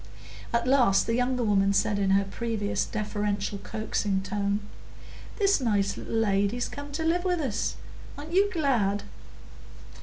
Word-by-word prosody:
At 235 0 +1
last 250 -7 +4
the 230 - -1
younger 250 +1 +1
woman 200 -2 +3
said 200 +1 +1
in 195 -1 +1
her 195 +1 +4
previous 210 +1 -2
deferential, 205 -1 -2
coaxing 205 -3 -2
tone,— 200 +1 -1 0.8
"This 395 -7 +3
nice 200 -4 +1
little - - -5
lady's 210 +2 +1
come 285 0 -8
to 320 +2 -2
live 345 +2 +1
with 360 -2 0
us; 255 -8 -1 0.4
aren't 300 +3 -8
you 395 +2 +4
glad?" 235 - +1
215 Hz, 145 wpm, -27 LUFS, 200-265 Hz, 0.8 s, last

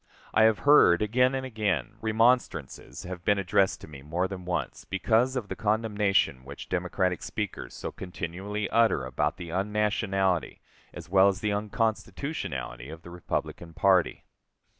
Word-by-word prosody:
I 110 - +5
have 110 -1 +4
heard 105 -11 +6
again 125 +5 +2
and 130 0 -3
again, 105 - -2
remonstrances 110 - 0
have 90 -2 -7
been 100 +2 +3
addressed 100 0 +1
to - - -10
me 70 -3 -11
more 85 +6 -1
than 95 -2 -7
once, 90 0 -3
because 115 +6 +1
of 120 -5 -3
the - - -5
condemnation 105 - +1
which 70 +2 -10
Democratic 90 0 -1
speakers 105 -3 -5
so - - -5
continually 95 +3 -5
utter 115 - +3
about 75 +4 -1
the 90 -3 -7
unnationality 95 - 0 0.3
as - - -10
well 95 +1 +5
as 100 +1 0
the 105 -2 0
unconstitutionality 105 - -3
of 80 +1 -10
the 85 - -11
Republican 85 -1 -4
party. 95 -3 +2
95 Hz, 150 wpm, -27 LUFS, 85-110 Hz, 0.3 s, heard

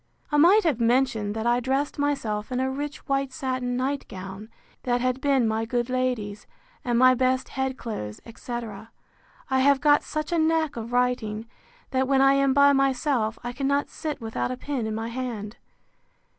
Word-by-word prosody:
I 295 - +2
might 370 +8 +6
have 300 -8 +1
mentioned, 230 -3 +1
that 220 0 -3
I 240 +1 +3
dressed 270 +4 -1
myself 260 -7 -1
in 250 - -1
a 260 0 0
rich 290 +2 -5
white 275 -1 0
satin 255 -2 -2
night 270 +2 -2
gown, 195 +3 -8 0.3
that 245 -1 0
had 255 +1 -1
been 275 -5 +3
my 220 +1 0
good 240 +2 -2
lady's, 245 -5 -2 0.4
and 240 -1 0
my 255 +1 +7
best 255 +1 +1
head 265 -1 -2
clothes, 105 - -6
etc. 230 -2 -7 0.6
I 265 - +3
have 275 +1 +4
got 290 0 +4
such 305 +2 -4
a 340 - +2
knack 320 -1 +1
of 230 0 -6
writing, 245 -3 0 0.5
that 260 -1 +1
when 270 0 +3
I 270 0 +6
am 275 0 +3
by 280 +1 +6
myself, 265 -4 +1
I 245 0 -4
cannot 280 +2 0
sit 305 -2 -5
without 225 0 -3
a 255 - -4
pen 260 -5 -3
in 215 - -3
my 225 +1 -3
hand. 235 -4 -5
255 Hz, 185 wpm, -25 LUFS, 230-275 Hz, 0.6 s, my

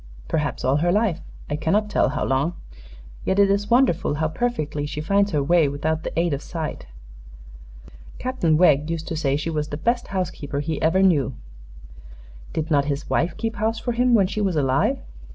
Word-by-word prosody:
"Perhaps 145 - -2
all 130 +2 +3
her 175 +3 +2
life; 200 -4 +1 0.3
I 145 - -2
cannot 180 +8 +1
tell - - +2
how 145 - -2
long. 140 +6 0 0.7
Yet 190 - 0
it 200 -1 +5
is 205 +1 0
wonderful 235 - +3
how 155 +1 0
perfectly 155 -9 -2
she 150 0 -5
finds 200 +6 +2
her 150 -6 0
way 165 +1 +4
without 155 +3 -1
the 165 - -3
aid 170 -2 +1
of 140 - -3
sight. 160 - -5 1.3
Captain 250 -12 +1
Wegg 150 -3 +4
used 165 -1 -3
to 165 - -3
say 140 -3 0
she 160 +2 -3
was 150 -1 -2
the 145 - -5
best 235 +8 0
housekeeper 155 -7 -3
he 150 +1 -3
ever 180 +4 +3
knew." 145 -9 +2 1.2
"Did 160 +1 -3
not 140 -2 +3
his 145 0 -3
wife 170 - 0
keep 225 0 -3
house 220 +2 0
for 240 - -2
him, 245 +1 +3
when 200 -4 +4
she 205 +3 -3
was 190 -4 0
alive?" 140 - +2
160 Hz, 190 wpm, -23 LUFS, 150-200 Hz, 1.3 s, it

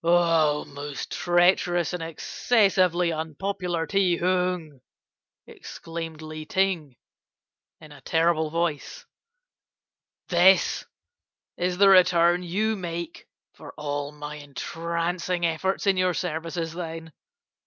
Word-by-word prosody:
"'Oh, 165 -3 +3
most 145 0 -7
treacherous 175 0 +2
and 180 - -3
excessively 180 0 +1
unpopular 170 +2 -3
Ti 185 -2 +2
Hung,' 180 -5 -1 0.6
exclaimed 165 -1 -8
Li 155 0 -7
Ting, 170 -5 -1 0.8
in 155 -1 -14
a 145 - -14
terrible 160 -1 +1
voice, 170 - -3 1.2
'this 180 +2 +4 0.7
is 180 0 -1
the 200 0 +6
return 175 -2 +5
you 210 +5 -1
make 170 -3 -6 0.3
for - - -12
all 145 -1 -3
my 150 0 -8
entrancing 170 +4 -3
efforts 170 +5 -1
in 195 -1 +3
your 185 -1 +1
services, 165 -1 -3
then? 165 -2 -7
170 Hz, 100 wpm, -25 LUFS, 160-180 Hz, 1.2 s, the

